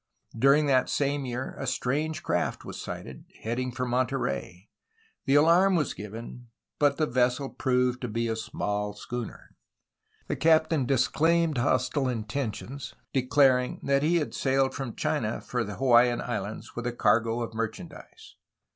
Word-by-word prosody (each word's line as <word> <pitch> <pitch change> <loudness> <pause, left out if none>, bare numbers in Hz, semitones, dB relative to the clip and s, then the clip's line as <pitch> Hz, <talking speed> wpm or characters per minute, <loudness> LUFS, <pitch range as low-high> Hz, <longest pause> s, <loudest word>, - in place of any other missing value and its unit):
During 140 +6 +4
that 130 -3 +3
same 140 -1 0
year 125 +2 -4
a - - -4
strange 155 +5 -1
craft 90 - -1
was - - -7
sighted, 65 -2 -7 0.2
heading 125 +3 -2
for 125 +1 -3
Monterey. 120 - -2 0.6
The 135 - +3
alarm 170 +6 +5
was 150 -6 0
given, 115 +4 -9 0.3
but 145 -1 +3
the 155 - +2
vessel 125 +1 +1
proved 125 -1 0
to 125 - -2
be 115 +1 -1
a 110 - -1
small 105 -2 -3
schooner. 120 +3 -7 0.7
The - - -1
captain 160 -4 +3
dis 130 -2 +3
claimed 165 -3 +2
hostile 130 +2 +1
intentions, 125 +3 -4 0.2
declaring 130 -1 +3
that 140 0 +2
he 160 +4 +2
had 155 -4 0
sailed 135 0 +1
from 135 -5 -5
China 110 -1 -1
for 120 -2 -2
the 105 -2 -6
Hawaiian 120 -2 +4
Islands 105 -3 -5
with 120 0 -3
a 120 - -2
cargo 115 0 +2
of 115 - -6
merchandise. 110 0 -7
125 Hz, 150 wpm, -27 LUFS, 115-140 Hz, 0.7 s, alarm